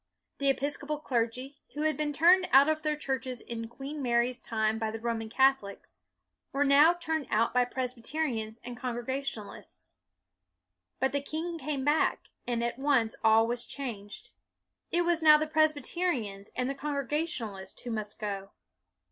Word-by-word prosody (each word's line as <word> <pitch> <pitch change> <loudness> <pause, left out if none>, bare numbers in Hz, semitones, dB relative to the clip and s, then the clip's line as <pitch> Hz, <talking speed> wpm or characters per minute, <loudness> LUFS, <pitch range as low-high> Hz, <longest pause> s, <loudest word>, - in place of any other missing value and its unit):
The 280 0 +2
Episcopal 285 +2 -1
clergy, 255 0 -2 0.2
who 300 - -2
had 310 -1 +2
been 300 +1 -1
turned 355 +5 +5
out 275 +2 +7
of 310 0 +1
their 305 -1 0
churches 265 -3 -3
in 230 0 -5
Queen 275 +5 -7
Mary's 240 0 +1
time 220 -1 -1
by 220 -1 -1
the 225 +1 -5
Roman 225 -1 -3
Catholics, 265 -5 +1 0.5
were 280 +1 +2
now 290 +4 +6
turned 320 -5 -2
out 225 +2 +2
by 250 0 +4
Presbyterians 245 -2 -3
and 245 0 -6
Congrega 250 +2 -3
tionalists. 230 -7 -8 1.0
But 265 +2 +1
the 285 - 0
king 325 +4 -4
came 275 -1 -3
back, 295 +2 +1 0.2
and 235 -1 0
at 235 +2 -2
once 265 -6 +2
all 220 0 +6
was 240 +1 -1
changed. 210 -7 -7 0.6
It 345 +1 +2
was 340 -1 +2
now 305 -1 +8
the 310 - 0
Presbyterians 305 - 0
and 250 0 -1
the 275 - -1
Congregationalists 280 - -3
who 245 - -5
must 215 -2 -4
go. 200 -2 -4
265 Hz, 155 wpm, -30 LUFS, 230-300 Hz, 1.0 s, now